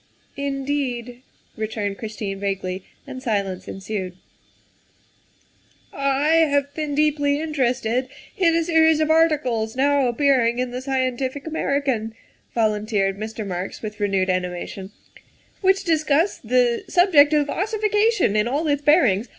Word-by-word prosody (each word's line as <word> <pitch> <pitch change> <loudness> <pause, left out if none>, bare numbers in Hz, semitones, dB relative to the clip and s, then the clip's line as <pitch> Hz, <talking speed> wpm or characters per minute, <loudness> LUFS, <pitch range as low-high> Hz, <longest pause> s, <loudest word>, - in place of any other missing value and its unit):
' - - -38
' - - -37
" - - -38
Indeed?" 275 -3 -3 0.3
returned 210 -2 -3
Christine 210 -3 -5
vaguely, 195 -2 -3 0.2
and 255 - -8
silence 200 -6 -2
ensued. 190 -2 -5 0.9
" - - -36
I 280 +3 +2
have 285 0 0
been 300 -1 -3
deeply 290 -1 +1
interested 255 -5 -1 0.3
in 335 -3 +3
a 335 - +2
series 320 -1 +4
of 310 0 +2
articles 280 -9 +1
now 280 0 +2
appearing 245 -2 +2
in 250 0 -2
the 250 +1 -5
Scientific 260 +1 -2
American," 275 -8 -1 0.4
volunteered 210 -3 0
Mr. 220 0 -5
Marks 185 +2 -5
with 210 -1 -6
renewed 195 -2 +1
animation, 185 +1 -4 0.4
" - - -35
which 385 0 +3
discuss 315 +2 +1
the 245 0 +1
subject 325 -5 +5
of 295 -1 +2
ossification 420 - +1
in 210 +1 +2
all 290 +6 -1
its 290 -1 +1
bearings. 265 - +3
260 Hz, 135 wpm, -22 LUFS, 215-300 Hz, 0.9 s, subject